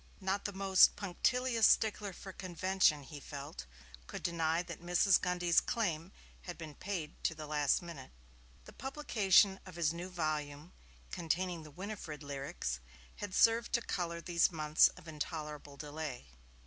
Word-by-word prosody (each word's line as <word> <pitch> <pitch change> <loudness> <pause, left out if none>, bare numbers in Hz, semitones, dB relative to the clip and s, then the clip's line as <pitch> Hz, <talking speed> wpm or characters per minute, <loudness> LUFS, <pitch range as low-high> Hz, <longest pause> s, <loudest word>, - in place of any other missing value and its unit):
Not 195 0 -1
the 205 - -1
most 195 -1 +5
punctilious 230 +5 +2
stickler 210 -2 +2
for 190 +1 -10
convention, 185 -4 +1
he 145 +2 -9
felt, 140 - -8 0.4
could - - -7
deny 165 -1 +1
that 170 -2 -8
Mrs. 175 +2 +4
Grundy's 175 -1 +3
claim 185 -7 -2 0.3
had 175 - -7
been 160 -3 -8
paid 170 -2 -5
to 165 - +1
the 155 -1 -7
last 150 +1 +1
minute. 165 -7 -9 0.6
The - - -12
publication 210 -8 +3
of 185 -3 -11
his 165 -2 +1
new 175 +2 -6
volume 155 -2 -3 0.4
containing 175 +1 -1
the 155 - -11
Winifred 170 -3 -7
lyrics 135 - -4 0.4
had 205 -3 -5
served 230 +1 +4
to 235 - +3
colour 170 -4 -3
these 170 +1 +2
months 155 -2 +5
of - - -13
intolerable 150 -2 -6
delay. 145 - -6
170 Hz, 150 wpm, -34 LUFS, 150-190 Hz, 0.6 s, most